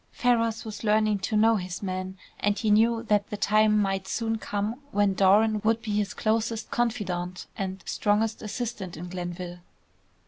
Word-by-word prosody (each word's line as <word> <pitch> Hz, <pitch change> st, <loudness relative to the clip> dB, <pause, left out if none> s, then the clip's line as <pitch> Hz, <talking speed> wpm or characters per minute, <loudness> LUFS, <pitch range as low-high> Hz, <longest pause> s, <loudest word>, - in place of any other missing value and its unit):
Ferrars 230 Hz, -2 st, +1 dB
was 215 Hz, 0 st, -7 dB
learning 215 Hz, -1 st, +2 dB
to 200 Hz, +3 st, -1 dB
know 225 Hz, +1 st, +5 dB
his 180 Hz, 0 st, -5 dB
man, 185 Hz, 0 st, -4 dB, 0.2 s
and 205 Hz, 0 st, +1 dB
he 215 Hz, -, +1 dB
knew 225 Hz, +2 st, +4 dB
that 210 Hz, -2 st, +1 dB
the 210 Hz, -, -4 dB
time 215 Hz, +1 st, +3 dB
might 195 Hz, -1 st, -1 dB
soon 225 Hz, 0 st, -1 dB
come 210 Hz, +5 st, -3 dB
when 205 Hz, -6 st, +2 dB
Doran 210 Hz, +3 st, +4 dB
would 225 Hz, +1 st, +1 dB
be 220 Hz, -, -3 dB
his 205 Hz, -2 st, -1 dB
closest 225 Hz, +1 st, -1 dB
confidant 185 Hz, -7 st, -2 dB
and 190 Hz, -2 st, -4 dB
strongest 215 Hz, +1 st, 0 dB
assistant 215 Hz, -5 st, -5 dB
in 175 Hz, +2 st, -7 dB
Glenville. 175 Hz, 0 st, -6 dB
210 Hz, 165 wpm, -27 LUFS, 190-225 Hz, 0.2 s, know